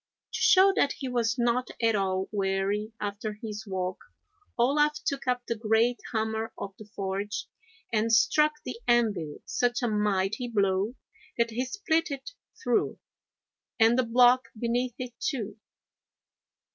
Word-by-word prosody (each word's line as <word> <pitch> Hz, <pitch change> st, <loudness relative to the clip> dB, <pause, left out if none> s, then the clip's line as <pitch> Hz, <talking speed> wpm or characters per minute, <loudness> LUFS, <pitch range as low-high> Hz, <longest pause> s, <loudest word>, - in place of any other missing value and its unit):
To -, -, -2 dB
show 390 Hz, +1 st, +6 dB
that 280 Hz, -, +3 dB
he 270 Hz, -, -6 dB
was 235 Hz, -2 st, 0 dB
not 240 Hz, +1 st, +1 dB
at 230 Hz, -1 st, +3 dB
all 190 Hz, -1 st, 0 dB
weary 200 Hz, +1 st, -1 dB
after 205 Hz, +1 st, -3 dB
his 210 Hz, 0 st, -7 dB
walk 185 Hz, -1 st, -3 dB, 0.6 s
Olaf 295 Hz, +5 st, +3 dB
took 275 Hz, -2 st, -2 dB
up 250 Hz, -1 st, 0 dB
the -, -, -1 dB
great 225 Hz, +2 st, +2 dB
hammer 220 Hz, 0 st, -1 dB
of 195 Hz, -, -6 dB
the 215 Hz, -1 st, -12 dB
forge 195 Hz, +2 st, -3 dB, 0.5 s
and 225 Hz, +1 st, +2 dB
struck 300 Hz, +8 st, +4 dB
the 250 Hz, -2 st, -5 dB
anvil 210 Hz, -11 st, +2 dB
such 245 Hz, +1 st, 0 dB
a -, -, +2 dB
mighty 210 Hz, +2 st, 0 dB
blow 200 Hz, 0 st, +1 dB, 0.4 s
that 235 Hz, -1 st, +1 dB
he 240 Hz, +3 st, -1 dB
split 330 Hz, 0 st, 0 dB
it 280 Hz, -, -6 dB, 0.3 s
through, 245 Hz, -2 st, +1 dB, 0.8 s
and 225 Hz, +1 st, +6 dB
the 255 Hz, -, +4 dB
block 245 Hz, +2 st, +5 dB
beneath 240 Hz, +1 st, -1 dB
it, 250 Hz, -1 st, -6 dB
too. 225 Hz, -8 st, -3 dB
230 Hz, 145 wpm, -28 LUFS, 205-250 Hz, 0.8 s, show